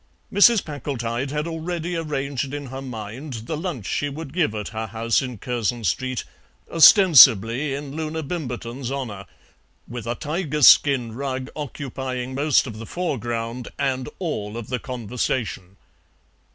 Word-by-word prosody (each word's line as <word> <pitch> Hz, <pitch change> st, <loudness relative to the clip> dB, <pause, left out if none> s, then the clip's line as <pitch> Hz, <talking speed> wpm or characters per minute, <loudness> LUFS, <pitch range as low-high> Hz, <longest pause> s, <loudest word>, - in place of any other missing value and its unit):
Mrs. 205 Hz, +1 st, +6 dB
Packletide 135 Hz, -4 st, -3 dB
had 150 Hz, +2 st, -2 dB
already 170 Hz, +1 st, -3 dB
arranged 140 Hz, -4 st, -3 dB
in 145 Hz, -1 st, -5 dB
her 135 Hz, -, -5 dB
mind 125 Hz, +3 st, -7 dB
the 155 Hz, -, -3 dB
lunch 155 Hz, -, -4 dB
she 145 Hz, -, -1 dB
would 145 Hz, 0 st, -8 dB
give 160 Hz, -11 st, +1 dB
at 105 Hz, -2 st, -4 dB
her 110 Hz, 0 st, -4 dB
house 115 Hz, +2 st, +1 dB
in 125 Hz, -3 st, -5 dB
Curzon 120 Hz, +1 st, -2 dB
Street, 130 Hz, +6 st, -1 dB, 0.5 s
ostensibly 140 Hz, -, +7 dB
in 140 Hz, 0 st, -7 dB
Loona 160 Hz, 0 st, -3 dB
Bimberton's 130 Hz, -5 st, -5 dB
honour, 110 Hz, -9 st, -5 dB, 0.6 s
with 120 Hz, -1 st, -7 dB
a 120 Hz, -, -1 dB
tiger 150 Hz, 0 st, -2 dB
skin 125 Hz, -4 st, +6 dB
rug 130 Hz, 0 st, -4 dB
occupying 130 Hz, -2 st, -5 dB
most 145 Hz, +2 st, +3 dB
of 110 Hz, -4 st, -7 dB
the 115 Hz, -, -8 dB
foreground 120 Hz, -7 st, -3 dB
and 135 Hz, -1 st, -1 dB
all 115 Hz, -, -4 dB
of 120 Hz, -, -7 dB
the 125 Hz, -1 st, -1 dB
conversation. 115 Hz, -5 st, -3 dB
130 Hz, 140 wpm, -23 LUFS, 115-150 Hz, 0.6 s, ostensibly